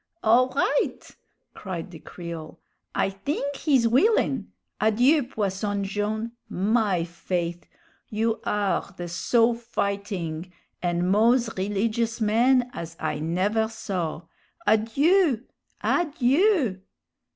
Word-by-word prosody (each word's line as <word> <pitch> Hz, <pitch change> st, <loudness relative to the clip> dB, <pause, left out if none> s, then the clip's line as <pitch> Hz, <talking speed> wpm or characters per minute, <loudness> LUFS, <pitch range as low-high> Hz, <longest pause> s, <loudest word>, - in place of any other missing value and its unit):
"All 240 Hz, +4 st, +5 dB
right!" -, -, -1 dB, 0.4 s
cried 185 Hz, -3 st, -6 dB
the 165 Hz, -, -10 dB
Creole; 170 Hz, -3 st, -8 dB, 0.4 s
"I -, -, +1 dB
thing 275 Hz, +12 st, -3 dB
he's 270 Hz, -5 st, +2 dB
willin'. 265 Hz, -, +2 dB, 0.3 s
Adieu, 245 Hz, +8 st, +4 dB
Posson 205 Hz, -4 st, -2 dB
Jone'. 210 Hz, +3 st, -2 dB, 0.2 s
My 200 Hz, -3 st, +1 dB
faith'! 175 Hz, 0 st, -4 dB, 0.4 s
you 220 Hz, +1 st, -1 dB
are 200 Hz, -1 st, -1 dB
the 175 Hz, -, -5 dB
so 230 Hz, +7 st, +2 dB
fighting 200 Hz, -7 st, -3 dB, 0.3 s
an' 175 Hz, 0 st, 0 dB
moz 225 Hz, +5 st, +3 dB
rilligious 220 Hz, +4 st, -1 dB
man 245 Hz, +3 st, +3 dB
as 165 Hz, 0 st, -7 dB
I -, -, -2 dB
never 190 Hz, +8 st, +1 dB
saw! 180 Hz, -7 st, -4 dB, 0.4 s
Adieu! 250 Hz, -, +3 dB, 0.4 s
Adieu!" 295 Hz, -, +2 dB
215 Hz, 100 wpm, -25 LUFS, 185-240 Hz, 0.4 s, All